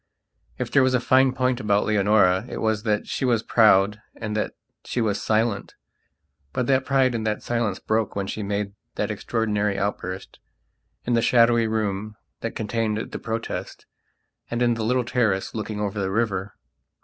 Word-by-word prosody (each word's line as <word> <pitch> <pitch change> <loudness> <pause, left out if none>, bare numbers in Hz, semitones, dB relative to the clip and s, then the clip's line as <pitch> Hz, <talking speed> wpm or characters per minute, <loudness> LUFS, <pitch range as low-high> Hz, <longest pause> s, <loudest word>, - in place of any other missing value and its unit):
If - - -4
there 140 - +5
was 130 0 +3
a - - +3
fine 130 +2 +4
point 125 -1 0
about 105 -1 +2
Leonora 100 -3 +3
it - - -5
was 110 -2 0
that 105 -2 0
she - - -3
was 120 -3 +2
proud 105 -2 +4
and 105 -1 -4
that 105 - -2 0.3
she - - -3
was 105 -3 0
silent. 110 -1 0 0.8
But 125 - 0
that 130 +1 +2
pride 135 -2 +3
and 115 -2 -2
that 105 - -2
silence 115 -5 -1
broke 110 -1 -1
when 100 -1 -1
she 105 - -4
made 100 0 -2 0.2
that - - -1
extraordinary 105 -3 -1
outburst, 95 -1 -4 0.7
in 120 - 0
the 115 - +3
shadowy 115 -1 +4
room 110 -1 -2 0.2
that 115 - -4
contained 110 0 -1
the - - -5
Protest, 115 0 -5 0.6
and 120 +1 0
in 120 -1 +3
the 115 -1 -3
little 125 +2 +1
terrace 110 -6 0
looking 110 -1 -4
over 105 0 -2
the 95 -1 -1
river. 100 -2 -1
110 Hz, 175 wpm, -24 LUFS, 105-120 Hz, 0.8 s, there